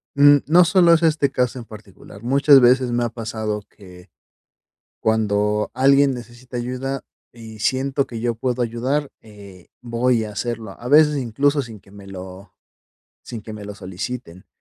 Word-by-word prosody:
Mm, 145 +1 +7
no 175 +3 +6
solo 175 -1 +5
es 165 0 +2
este 155 -3 +2
caso 125 0 -1
en 120 - -10
particular. 105 -1 -14
Muchas 140 +2 +5
veces 125 0 +3
me 120 0 0
ha 120 - -1
pasado 110 -2 -4
que, 90 -2 -16 0.9
cuando 105 -1 0
alguien 140 +1 +4
necesita 120 +1 -10
ayuda, 130 +3 -4 0.3
y 110 -2 -12
siento 135 +3 0
que 115 -2 -7
yo 120 0 -1
puedo 125 +2 -3
ayudar, 130 +5 -2
eh, 100 -4 -15
voy 120 -1 0
a 105 - -7
hacerlo, 110 -1 -5
a 120 - -7
veces 150 +1 +5
incluso 140 +4 0
sin 110 -4 -11
que - - -22
me 100 -1 -13
lo 95 +1 -10 0.7
sin 115 -4 -8
que 110 - -9
me 105 -1 -9
lo 105 - -7
soliciten. 95 0 -7
120 Hz, 165 wpm, -21 LUFS, 105-135 Hz, 0.9 s, Mm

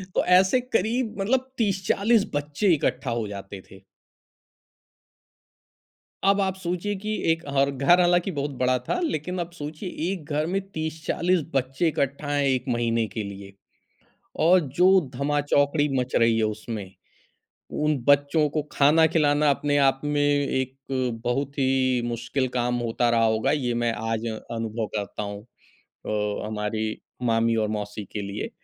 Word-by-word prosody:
तो - - +2
ऐसे 185 +6 +5
करीब 235 0 -1
मतलब 260 +5 0
30-40 205 +1 +2
बच्चे 150 +6 +1
इकट्ठा 130 -3 -1
हो 110 - -3
जाते 100 -1 -8
थे। 95 0 -14 2.5
अब 200 0 +4
आप 190 -1 0
सोचिए 180 +3 -2
कि 215 +1 -3 0.2
एक 165 - -1
और 140 0 +2
घर 140 +7 +4
हालाँकि 175 +2 +2
बहुत 145 -1 -3
बड़ा 125 0 +2
था, - - 0
लेकिन 180 - -2
अब 170 0 -4
सोचिए 155 +2 -6 0.2
एक 180 -6 -5
घर 150 +1 +1
में 195 +3 -1
30-40 160 +2 -1
बच्चे 135 +5 0
इकट्ठा 140 -1 -1
हैं 145 0 +1
1 130 -2 +1
महीने 115 -1 +1
के 105 +2 -5
लिए 100 0 -9 0.9
और 180 +2 +6 0.2
जो 180 +1 +6 0.3
धमा 145 +3 0
चौकड़ी 145 +1 +2
मच 125 0 -3
रही 115 -1 +4
है 110 - +2
उसमें, 105 -2 -5 0.8
उन 150 -1 0
बच्चों 145 +2 +4
को 150 +2 -1
खाना 150 +3 +5
खिलाना 150 -2 +3
अपने 145 +1 +1
आप 135 -1 +3
में 145 0 0
एक 140 -2 0 0.5
बहुत 140 +4 -2
ही 130 -2 +2
मुश्किल 120 +3 -2
काम 125 0 0
होता 120 0 0
रहा 115 -1 +3
होगा, 110 0 +1
ये 130 -5 0
मैं 120 0 0 0.2
आज 115 0 -2
अनुभव 115 0 -4
करता 105 0 -3
हूँ 100 0 -6 0.7
अ, 105 0 -2
हमारी 110 0 -2 0.4
मामी 115 -1 +2
और - - -2
मौसी 105 0 -4
के 105 - -3
लिए 100 +1 -5
140 Hz, 150 wpm, -25 LUFS, 115-165 Hz, 2.5 s, और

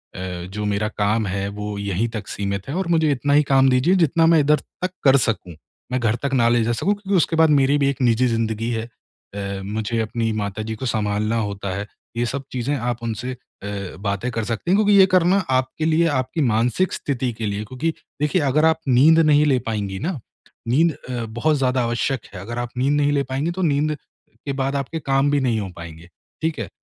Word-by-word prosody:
अ, - - -7 0.3
जो 105 +3 -5
मेरा 105 +1 0
काम 105 +2 +1
है 100 +1 -2
वो 105 0 -4
यहीं 100 +2 -1
तक 105 - -7
सीमित 100 -1 -3
है 140 - -3
और 190 -1 -1
मुझे 160 -2 +3
इतना 140 +1 0
ही 150 +1 +5
काम 135 0 +5
दीजिए 130 +9 +3
जितना 165 +3 +2
मैं 160 - +6
इधर 150 +1 +4 0.3
तक 185 - 0
कर 135 -1 +6
सकूँ। 90 -6 -4 0.4
मैं 130 - 0
घर 115 -2 +1
तक 140 -1 -1
ना 120 -3 +4
ले 120 -1 +3
जा 115 - 0
सकूँ 195 - +1
क्योंकि 200 -1 -2
उसके 165 0 +1
बाद 160 0 +5
मेरी 140 -1 +4
भी 140 -1 +2
एक 140 - -3
निजी 120 0 +3
ज़िंदगी 115 -1 -1
है 110 -1 -2 0.5
अ, 100 -1 -4
मुझे 110 +3 -2
अपनी 115 0 -1
माताजी 110 +1 -3
को 120 - -6
सँभालना 105 -1 0
होता 100 -2 -3
है। 100 +1 -4 0.3
ये 120 - +1
सब 135 +3 -3
चीज़ें 130 +3 -1
आप 120 -2 -3
उनसे 115 +2 -3
अ, 100 -6 -8
बातें 100 +4 -2
कर 115 -1 -2
सकती 115 +10 -2
हैं - - +5
क्योंकि 210 -1 +4
ये 190 - +9
करना 180 +2 +4 0.2
आपके 130 +4 -4
लिए 165 +1 +3
आपकी 130 +6 -2
मानसिक 120 +12 +1
स्थिति 130 -3 -2
के 110 0 -5
लिए 100 +1 -3
क्योंकि 130 +9 -2 0.3
देखिए 150 +4 +2
अगर 145 +3 +3
आप 160 0 +3
नींद 140 +6 +6
नहीं 150 -2 +5
ले 135 -4 +3
पाएँगी 100 -4 -3
ना, 165 - -3 0.5
नींद 155 +7 +3 0.2
अ, 120 -2 -3
बहुत 120 +8 0
ज़्यादा 130 -2 +1
आवश्यक 120 +1 -1
है 95 - -7
अगर 120 +5 -6
आप 120 -1 -3
नींद 135 +3 +2
नहीं 145 0 +2
ले 140 -1 +1
पाएँगी 145 +6 -1
तो 185 +2 -4
नींद 155 -2 +1
अ, - - -2 0.5
के 140 - -2
बाद 135 +1 -1
आपके 140 +4 -3
काम 135 0 +1
भी 145 - +2
नहीं 120 -4 +1
हो 100 -2 -4
पाएँगे। 85 0 -10 0.3
ठीक 160 -3 -1
है? 105 -7 -4
125 Hz, 225 wpm, -22 LUFS, 110-145 Hz, 0.5 s, ये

